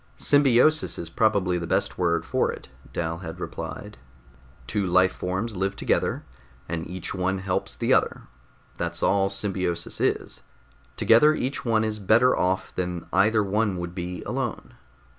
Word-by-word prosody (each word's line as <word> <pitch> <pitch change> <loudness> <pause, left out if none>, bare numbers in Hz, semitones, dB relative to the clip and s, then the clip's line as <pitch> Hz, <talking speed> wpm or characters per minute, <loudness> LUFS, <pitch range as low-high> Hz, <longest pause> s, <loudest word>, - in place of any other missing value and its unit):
"Symbiosis 145 +2 +3
is 85 -1 -6
probably 95 -4 +2
the 85 - -5
best - - 0
word 85 -2 +1
for - - +1
it," - - -10 0.2
Dal 80 0 -3
had 80 -3 -8
replied. - - -7 0.7
"Two 95 +9 -1
life 90 +1 +4
forms 95 +5 -3
live 95 +1 -1
together, - - 0 0.4
and 80 -1 -4
each 90 0 -5
one 95 0 -1
helps 95 -1 -2
the - - +1
other - - +1 0.6
that's - - -3
all 95 0 +3
symbiosis 95 -3 -2
is. - - -1 0.6
Together 150 +7 +5
each 135 -1 -3
one 110 -2 +2
is 110 -1 -2
better 110 +5 +4
off 95 +1 -1
than 90 -2 -3
either 105 +3 +4
one 100 -1 0
would 85 0 -5
be 90 0 -5
alone. 125 -3 -4
95 Hz, 150 wpm, -25 LUFS, 90-110 Hz, 0.7 s, Together